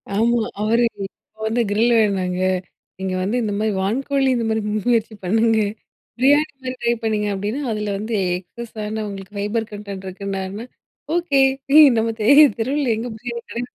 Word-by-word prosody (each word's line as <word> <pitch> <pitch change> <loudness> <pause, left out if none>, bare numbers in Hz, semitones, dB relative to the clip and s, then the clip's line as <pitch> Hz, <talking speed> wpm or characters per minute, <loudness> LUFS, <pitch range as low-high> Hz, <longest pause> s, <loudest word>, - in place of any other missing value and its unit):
ஆமா. 235 +2 +2 0.2
அவரு, 230 +3 +2 0.2
"இப்ப 215 +2 -17
வந்து 230 +2 +1
கிரில் 225 +4 +3
வேணுங்க. 185 -4 0 0.6
நீங்க 190 -1 -2
வந்து 200 +6 -1
இந்த 210 -2 -1
மாரி 215 0 +1
வான்கோழி 270 +7 0
இந்த 235 -1 -1
மாதிரி 220 0 0
மு 210 - -1
முயற்சி 230 -2 +1
பண்ணுங்க. 225 +4 +2 0.6
பிரியாணி 290 +5 +4
மாதிரி 255 0 -4
ட்ரை 235 0 +2
பண்ணுங்க," 215 -2 0
அப்டின்னா, 205 +8 -3
அதில 210 -1 -2
வந்து 215 +3 -4 0.2
எக்ஸஸான 215 +2 -6
உங்களுக்கு 195 +1 -9
ஃபைபர் 220 +2 -2
கன்டென்ட் 200 -2 -7
இருக்குன்னாருன்னா 195 +3 -5 0.5
ஓகே, 340 -6 +2 0.3
ஏ 310 - +10 0.2
நம்ம 225 +1 +1
தெ 210 - -1 0.3
தெருவில 265 +4 0
எங்க 225 +3 -4
பிரியாணி 235 +1 -5
கடை? 235 - -4
220 Hz, 155 wpm, -21 LUFS, 205-235 Hz, 0.6 s, ஏ